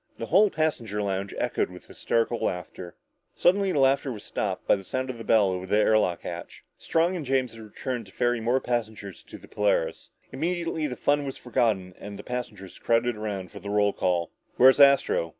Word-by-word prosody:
The 115 - -4
whole 200 - +4
passenger 135 - -2
lounge 100 0 -2
echoed - - -1
with - - -12
hysterical 115 0 -1
laughter. 90 0 -4 0.4
Suddenly 195 +1 +3
the - - -1
laughter 135 0 +3
was 105 -4 -8
stopped - - -3
by - - +5
the 95 - -8
sound 130 +6 -3
of 120 - -11
the - - -6
bell 105 -4 +3
over 90 0 -4
the 105 - +2
air 110 0 +4
lock 90 -4 -1
hatch. - - -8 0.2
Strong 170 +3 +1
and 170 - -4
James 130 -3 0
had 115 - -11
returned 115 +1 -5
to - - -15
ferry 120 +1 0
more 120 +4 +2
passengers 110 -6 -4
to - - -12
the - - -16
Polaris. - - -1 0.2
Immediately 165 -2 -2
the 125 - -5
fun 145 +2 +1
was 135 -1 -5
forgotten 110 -6 0
and 100 0 -8
the 100 - -9
passengers 120 -7 -6
crowded 115 +1 +1
around 100 -4 -5
for 100 - -9
the 100 +2 -7
roll 105 0 +2
call. 85 -2 -1 0.2
"Where's 130 +1 +6
Astro?" 140 -11 +5
115 Hz, 205 wpm, -26 LUFS, 100-135 Hz, 0.4 s, Where's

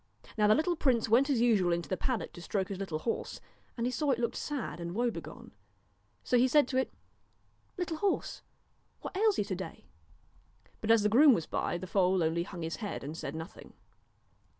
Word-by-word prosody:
Now 210 -1 +3
the 215 - +6
little 345 +4 +1
prince 250 -8 +2
went 255 +6 +4
as 255 -5 +2
usual 210 -7 +3
into 170 0 -1
the 185 - -1
pad 250 +3 -1
dock - - -8
to 175 - -10
stroke 190 +1 -2
his 195 -2 -5
little 185 -6 -3
horse, 230 +9 -3 0.4
and 235 - -1
he 250 - 0
saw 300 +3 -2
that 265 -4 +3
it - - -8
looked 235 - -1
sad 285 -11 -4
and 170 +1 -5
woebegone. 240 +1 -3 0.7
So 250 - +2
he 255 - +5
said 290 0 +4
to 260 - -1
it: 260 - 0 0.5
' - - -40
Little 345 -3 -2
horse! 400 +3 -1 0.6
what - - -7
ails 420 0 +3
you - - +2
to 200 -2 -3
day? 190 +1 -8 0.5
' - - -33
but 220 - -4
as 225 -2 +5
the 210 - +3
groom 265 +4 +7
was 165 - -2
by, - - -2
the 185 - -6
foal 185 -1 +2
only 160 +1 +1
hung 175 -1 -6
his 165 +1 -3
head 205 -9 -5
and 150 +3 -6
said 145 -2 -5
nothing. 160 +3 -9
220 Hz, 220 wpm, -31 LUFS, 180-260 Hz, 0.7 s, groom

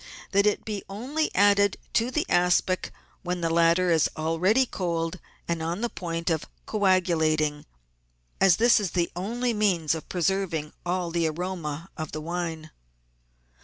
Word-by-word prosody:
That 200 +1 +4
it 210 - 0
be 210 -2 -4
only 265 +10 -2
added 200 0 +4 0.2
to 230 +2 +2
the 305 +6 -1
aspic 180 +1 +2 0.3
when 180 -1 -3
the 165 -1 0
latter 170 +2 +3
is 160 -2 +3
already 175 +11 +2
cold 170 -4 -3 0.3
and 170 -1 -1
on 170 +5 -3
the 240 - -1
point 170 -1 -3
of 160 -2 -1 0.2
coagulating, 160 -7 +1 0.7
as 195 -3 +6
this 235 0 +5
is 195 -5 -3
the 175 -2 0
only 235 +7 -1
means 185 -8 +1
of 160 - -6
preserving 175 -4 -1
all 175 -1 -1
the 165 -1 +1
aroma 165 -2 -4
of 155 -1 -5
the 155 - -4
wine. 165 -1 -4
175 Hz, 150 wpm, -26 LUFS, 165-200 Hz, 0.7 s, as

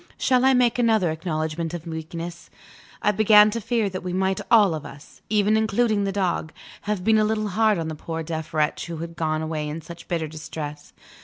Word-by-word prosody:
Shall 255 -1 +2
I 265 0 +5
make 250 -1 +2
another 220 -8 +3
acknowledgment 160 0 -3
of 170 -1 -7
weakness? 165 +1 -7 0.5
I 210 - +4
began 210 0 +6
to 230 +2 -3
fear 225 -1 0
that 185 -1 -5
we 180 -1 -4
might 190 +1 0
all 210 -6 +6
of 155 - -5
us 140 +2 -13
(even 210 0 +3
including 220 -1 +1
the 195 - -1
dog!) 185 -5 -1 0.4
have 205 -4 -1
been 220 +1 +4
a - - +3
little 215 0 0
hard 215 +1 +2
on 165 -1 -3
the 160 - -4
poor 165 +1 -5
deaf 160 -1 -5
wretch 155 +1 0
who 170 -1 -5
had 170 +1 -7
gone 155 -1 -1
away 155 -1 -3
in 155 +2 -5
such 170 +2 -11
bitter 165 -2 -2
distress. 150 -1 -7
175 Hz, 210 wpm, -24 LUFS, 160-215 Hz, 0.5 s, began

